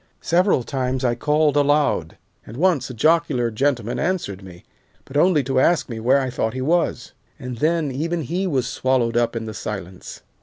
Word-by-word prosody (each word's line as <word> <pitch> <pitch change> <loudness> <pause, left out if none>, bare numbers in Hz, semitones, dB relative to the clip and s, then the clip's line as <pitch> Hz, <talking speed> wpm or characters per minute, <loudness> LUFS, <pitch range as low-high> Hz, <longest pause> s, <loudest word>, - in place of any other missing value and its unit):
Several 175 -5 +2
times 130 -1 -2
I 120 - +2
called 150 +4 +1
aloud, 145 - +1 0.3
and 115 - -11
once 170 -4 +1
a - - -6
jocular 150 -3 +2
gentleman 120 -1 -1
answered 155 - -2
me, 90 -2 -13 0.4
but 135 - -13
only 155 -1 +3
to 130 0 0
ask 165 +2 +2
me 115 -2 -5
where 130 +5 +3
I 130 -1 -3
thought 110 -1 -2
he - - -3
was, 165 +5 0 0.3
and 125 -5 -7
then 155 -1 +1
even 165 +5 -2
he 180 +8 -2
was 135 -7 0
swallowed 125 -3 0
up 120 0 +1
in 115 -1 -3
the 110 - -6
silence. 95 -4 -7
130 Hz, 185 wpm, -21 LUFS, 120-155 Hz, 0.4 s, only